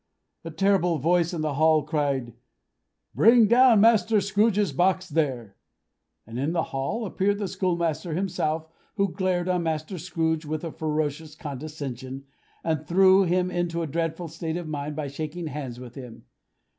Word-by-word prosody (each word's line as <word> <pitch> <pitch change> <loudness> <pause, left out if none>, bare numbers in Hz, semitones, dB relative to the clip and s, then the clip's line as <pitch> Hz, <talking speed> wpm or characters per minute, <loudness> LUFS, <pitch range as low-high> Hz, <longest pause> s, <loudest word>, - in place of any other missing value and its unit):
A 165 - -6
terrible 180 0 +2
voice 170 +3 +2
in 170 -3 -3
the 155 -2 -1
hall 155 +1 +3
cried, 140 -5 -1 0.8
"Bring 230 +1 +6
down 235 -1 +6
Master 225 -1 +4
Scrooge's 205 0 +1
box, 185 +1 +1
there!" 130 - -2 0.7
and 115 +2 -7
in 145 +5 -1
the 165 -2 +1
hall 135 - -2
appeared 200 +1 0
the 205 -1 -2
schoolmaster 170 -4 -1
himself, 160 -4 -1 0.3
who 200 -3 +1
glared 185 -2 -1
on 180 -1 +1
Master 160 +2 -3
Scrooge 160 -1 -1
with 155 +1 -4
a 165 - -4
ferocious 155 0 -3
condescension, 140 -3 -6 0.4
and 155 -2 -2
threw 190 +2 +5
him 180 +1 +1
into 175 -1 -1
a - - -1
dreadful 165 +2 -3
state 160 +1 -4
of 175 -2 -5
mind 150 -1 -4
by 150 -1 -3
shaking 155 +4 -5
hands 135 -5 -6
with 125 -2 -10
him. 125 -4 -11
165 Hz, 155 wpm, -25 LUFS, 150-185 Hz, 0.8 s, Bring